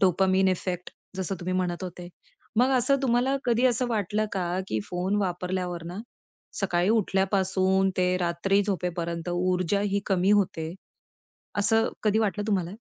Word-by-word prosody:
Dopamine 190 0 +3
effect 180 -1 -2 0.3
जसं 190 +1 -2
तुम्ही 185 +1 -3
म्हणत 180 0 -1
होते. 175 0 -7 0.5
मग 250 +3 +4
असं 275 +3 +3
तुम्हाला 255 +1 +2
कधी 240 0 +2
असं 250 0 +1
वाटलं 215 -1 0
का 180 -2 -1
की 110 - -1
फोन 180 - -1
वापरल्यावर 180 -1 -3
ना 180 +3 -6 0.6
सकाळी 180 -2 +1
उठल्यापासून 190 -2 +2
ते 180 0 +2
रात्री 180 +3 +1
झोपेपर्यंत 175 -3 -3
ऊर्जा 180 +2 +1
ही 200 0 0
कमी 190 0 +2
होते. 170 -5 0 0.8
असं 225 +2 +3 0.2
कधी 215 +1 +3
वाटलं 210 -1 0
तुम्हाला? 185 -5 0
190 Hz, 140 wpm, -26 LUFS, 180-205 Hz, 0.8 s, मग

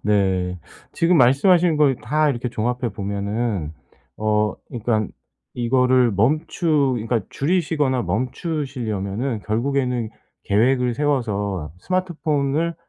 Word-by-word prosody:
네. 95 -3 +1 0.3
지금 170 +1 +3
말씀하신 160 +6 +4
거 150 -1 +5
이 130 - -2
다 150 +5 +2
이렇게 125 -1 -3
종합해 120 +1 -2
보면은 100 -3 -2 0.4
어 105 0 +1
그러니까 110 -3 -1 0.5
이거를 125 -1 +3
멈추 145 - +1
그러니까 115 +1 0
줄이시거나 145 -5 0
멈추시려면은 120 - -3
결국에는 125 0 0 0.3
계획을 125 +3 +2
세워서 105 - -1
스마트폰을 165 - -1
125 Hz, 275 characters per minute, -22 LUFS, 105-145 Hz, 0.5 s, 거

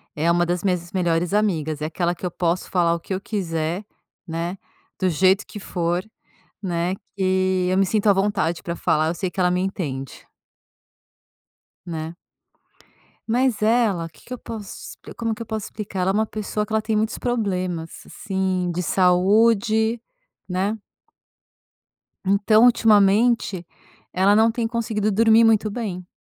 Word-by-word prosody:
é 160 +3 +1
uma 175 0 +2
das 175 0 -2
minhas 180 -3 -1
melhores 175 -1 0
amigas. 160 -8 0
É - - -1
aquela 170 +2 -1
que 180 - -8
eu 180 - -2
posso 175 +1 -1
falar 170 -2 +2
o 170 - -2
que 180 - -6
eu 190 - -3
quiser, 175 -2 -3 0.4
né, 170 +3 -3 0.4
do 185 - +2
jeito 190 +4 +3
que 210 - -8
for, 175 -2 -2 0.6
né, 175 0 -1 0.2
que 185 -1 +1
eu 185 - +1
me 195 - +4
sinto 210 +2 +1
à - - +8
vontade 195 -4 0
pra 170 0 -4
falar 155 -1 +1
eu 165 - -1
sei 185 +2 -2
que 190 - -5
ela 180 -1 +3
me 180 0 +1
entende. 145 -9 -4 1.6
Né? 160 0 -5 1.1
Mas, 245 0 +1
ela 215 -6 +2
que 160 - -19
que 255 - -8
eu - - -5
posso 215 -4 -8
te - - -10
como 230 -2 -2
que 230 - -10
eu 230 - -4
posso 220 -1 -4
explicar? 205 -3 -6
Ela 185 +1 +2
é - - -2
uma 220 +1 +2
pessoa 210 0 -3
que 210 - -16
ela 220 0 +2
tem 220 0 -1
muitos 220 +2 0
problemas, 185 -8 -3
assim, 190 -2 -2
de 175 +1 -2
saúde, 215 +6 +3 0.5
né? 195 +4 -1 1.5
Então, 205 +4 +4
ultimamente 215 -4 +3 0.5
ela 195 +2 +4
não 225 +1 +5
tem 230 0 -1
conseguido 220 -2 -1
dormir 225 +2 +5
muito 220 -1 +3
bem. 200 -5 -5
190 Hz, 165 wpm, -22 LUFS, 175-215 Hz, 1.6 s, à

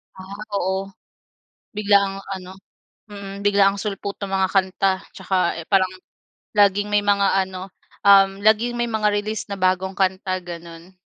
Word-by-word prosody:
Ah, 190 +2 -10 0.2
oo. 190 +1 -2 0.8
Biglaang 200 -2 +2 0.2
ano 185 0 -8 0.5
mm, 200 -1 -8
biglaang 200 -1 +3
sulpot 200 -1 -5
nung 195 -1 -2
mga 190 -1 0
kanta 190 0 +2 0.2
tsaka, 185 -3 0
eh, 165 - -7
parang 190 +1 +2 0.6
laging 205 0 +3
may 205 - +4
mga 200 -1 +2
ano, 185 0 -8 0.3
um, 195 0 +5
laging 225 +3 +3
may 240 - 0
mga 220 -2 0
release 215 +1 -3
na 200 - -4
bagong 185 +1 0
kanta, 190 -1 0
ganun. 170 +1 -10
195 Hz, 140 wpm, -22 LUFS, 190-205 Hz, 0.8 s, um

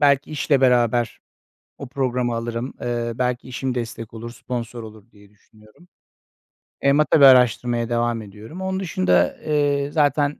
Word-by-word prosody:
belki 140 0 +3
işle 145 -2 +1
beraber 120 -2 +2 0.6
o 140 - -7
programı 125 -2 -1
alırım. 115 +2 -4
Eee, 120 -1 -2
belki 125 0 -2
işim 130 0 -3
destek 115 -2 -6
olur, 115 +1 -7
sponsor 120 -1 -6
olur 110 0 -13
diye 105 -2 -20
düşünüyorum. 110 - -23 1.0
Eee, 140 - +4
ama 150 +2 +3
tabii 150 - +3
bir - - +10
araştırmaya 120 -2 +3
devam 120 -1 0
ediyorum. 110 - -11
Onun 190 0 -2
dışında, 90 - +1
eee, 145 -2 0
zaten 145 -1 +1
120 Hz, 150 wpm, -22 LUFS, 115-140 Hz, 1.0 s, bir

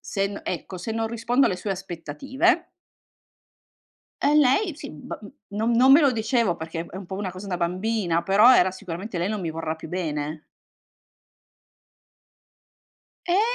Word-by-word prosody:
se 195 -1 -1
n 200 0 -6
ecco 185 +2 -5
se 180 +5 -5
non 225 0 -1
rispondo 235 +3 +1
alle - - 0
sue 185 +3 -5
aspettative 195 - -1 1.5
ehm, 295 +1 +4
lei, 300 +6 +3
sì, - - -8
ba 150 - -8
n 205 - -10 0.2
non 220 +3 -1
non 255 +3 +6
me 290 - +8
lo 285 -4 +5
dicevo, 225 -5 +1
perché 165 +1 -5
è - - -9
un 195 - -7
po' 190 - -5
una 195 -2 -3
cosa 185 +3 -9
da 180 -2 -2
bambina, 180 0 0
però 210 +7 +6
era 185 +1 +4
sicuramente: 185 +1 -6
"Lei 175 +3 0
non 215 -1 -2
mi 170 -3 -3
vorrà 160 0 -3
più 160 0 -10
bene." 155 -3 -3 2.9
Eh 360 +3 +4
195 Hz, 165 wpm, -24 LUFS, 170-230 Hz, 2.9 s, me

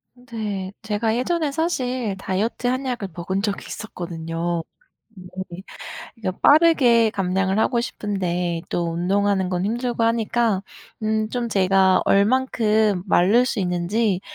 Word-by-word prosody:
네. 215 -6 -5
제가 220 0 -1
예전에 305 +4 0
사실 255 - -1
다이어트 210 +6 -2
한약을 250 -5 -2
먹은 190 +3 -2
적이 205 -1 -2
있었거든요. 170 -4 -4 0.5
네. 185 -1 -8 0.6
그러니까 190 -5 -4
빠르게 280 -8 +5
감량을 190 0 0
하고 235 +2 +2
싶은데 180 -7 -2
또 170 -1 -1
운동하는 190 +2 +1
건 180 0 -1
힘들고 235 +2 -1
하니까 230 -2 +1 0.4
음 215 0 0
좀 245 -1 -2
제가 190 -2 +3
얼만큼 215 -2 +2
마를 205 +8 +4
수 245 - -1
있는지 185 +3 0
205 Hz, 270 characters per minute, -22 LUFS, 185-235 Hz, 0.6 s, 빠르게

